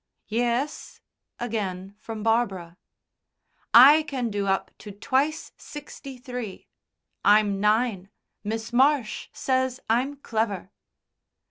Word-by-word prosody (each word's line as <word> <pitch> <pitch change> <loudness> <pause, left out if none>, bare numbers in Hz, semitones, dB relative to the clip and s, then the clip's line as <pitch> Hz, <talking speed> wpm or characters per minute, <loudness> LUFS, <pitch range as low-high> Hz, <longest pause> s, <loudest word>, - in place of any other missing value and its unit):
"Yes," 240 +6 -2 0.4
again 200 -5 -4
from 220 -1 -7
Barbara. 195 -7 0 0.9
"I 275 +7 +9
can 260 -6 -3
do 200 -1 -2
up 195 0 0
to 210 - -9
twice 275 +9 -1
sixty 280 -2 -10
three. 245 -5 -7 0.6
I'm 205 -1 +4
nine. 210 -2 +1 0.3
Miss 225 +2 -4
Marsh 265 -2 +2
says 260 -1 -1
I'm 255 +6 +1
clever." 220 -8 -3
230 Hz, 100 wpm, -25 LUFS, 205-260 Hz, 0.9 s, I